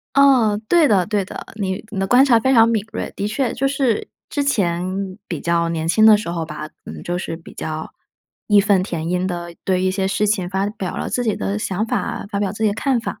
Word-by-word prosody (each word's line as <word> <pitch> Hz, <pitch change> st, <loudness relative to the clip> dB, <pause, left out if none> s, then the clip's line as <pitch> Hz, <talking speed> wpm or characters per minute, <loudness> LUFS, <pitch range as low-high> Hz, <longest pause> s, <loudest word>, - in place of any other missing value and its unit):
哦， 255 Hz, -7 st, +5 dB
对 335 Hz, -4 st, +5 dB
的 190 Hz, -5 st, +3 dB
对 205 Hz, -2 st, 0 dB
的， -, -, -8 dB
你 195 Hz, -2 st, -3 dB
你 200 Hz, -3 st, -3 dB
的 195 Hz, -, 0 dB
观 250 Hz, +6 st, +6 dB
察 240 Hz, -5 st, +4 dB
非 265 Hz, +4 st, +2 dB
常 230 Hz, -3 st, +6 dB
敏 220 Hz, -3 st, 0 dB
锐， -, -, -4 dB
的 200 Hz, -, -2 dB
确， 230 Hz, +3 st, -1 dB
就 275 Hz, -, 0 dB
是 270 Hz, -5 st, 0 dB, 0.2 s
之 290 Hz, -, -1 dB
前 185 Hz, -5 st, -1 dB
比 170 Hz, -, -4 dB
较 170 Hz, 0 st, +1 dB
年 165 Hz, -1 st, -2 dB
轻 215 Hz, +6 st, +4 dB
的 220 Hz, -1 st, +9 dB
时 210 Hz, -, -6 dB
候 170 Hz, -1 st, -2 dB
吧， 155 Hz, -1 st, -7 dB, 0.2 s
嗯， -, -, -8 dB
就 175 Hz, -, -2 dB
是 175 Hz, -2 st, -4 dB
比 165 Hz, -, -14 dB
较 155 Hz, 0 st, -5 dB, 0.6 s
义 205 Hz, -2 st, +6 dB
愤 200 Hz, -2 st, +3 dB
填 170 Hz, -4 st, -4 dB
膺 180 Hz, +1 st, 0 dB
地 175 Hz, -1 st, -5 dB
对 185 Hz, -1 st, +1 dB
一 185 Hz, -, +2 dB
些 190 Hz, 0 st, -1 dB
事 210 Hz, +2 st, +1 dB
情 195 Hz, -4 st, 0 dB
发 190 Hz, +1 st, 0 dB
表 205 Hz, -3 st, -5 dB
了 -, -, -3 dB
自 245 Hz, -, -1 dB
己 220 Hz, -4 st, 0 dB
的 100 Hz, +1 st, -2 dB
想 195 Hz, -, -1 dB
法， -, -, -2 dB
发 200 Hz, -1 st, -2 dB
表 200 Hz, -2 st, 0 dB
自 210 Hz, +3 st, -3 dB
己 215 Hz, -, +4 dB
的 -, -, -3 dB
看 265 Hz, +2 st, +1 dB
法。 230 Hz, -, -6 dB
200 Hz, 265 characters per minute, -20 LUFS, 175-220 Hz, 0.6 s, 的